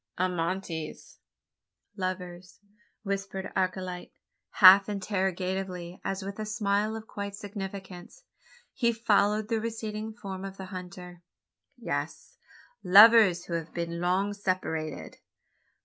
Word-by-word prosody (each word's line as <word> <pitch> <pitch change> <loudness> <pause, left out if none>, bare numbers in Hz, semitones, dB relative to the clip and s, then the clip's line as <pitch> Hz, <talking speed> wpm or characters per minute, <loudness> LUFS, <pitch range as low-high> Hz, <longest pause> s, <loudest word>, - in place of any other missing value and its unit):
"Amantes?" 175 -2 -3 0.8
(lovers), 180 -2 -5 0.4
whispered 195 -1 -4
Archilete, 185 -1 -2 0.4
half 195 +2 +8
interrogatively, 190 -2 -3
as 195 0 -3
with 200 +2 -7
a - - -2
smile 210 0 0
of 220 0 -7
quiet 200 -2 -6
significance 195 - -8 0.5
he 235 -3 +2
followed 210 -1 +2
the 225 -1 -1
receding 220 -1 -4
form 195 -3 -7
of 195 0 -7
the 190 - -7
hunter. 180 -1 -9 0.6
"Yes; - - -5 0.5
lovers 200 -2 +7
who 170 - -6
have 165 -1 -4
been 170 0 -3
long 190 +3 +1
separated." 185 -6 -3
190 Hz, 105 wpm, -28 LUFS, 180-205 Hz, 0.8 s, half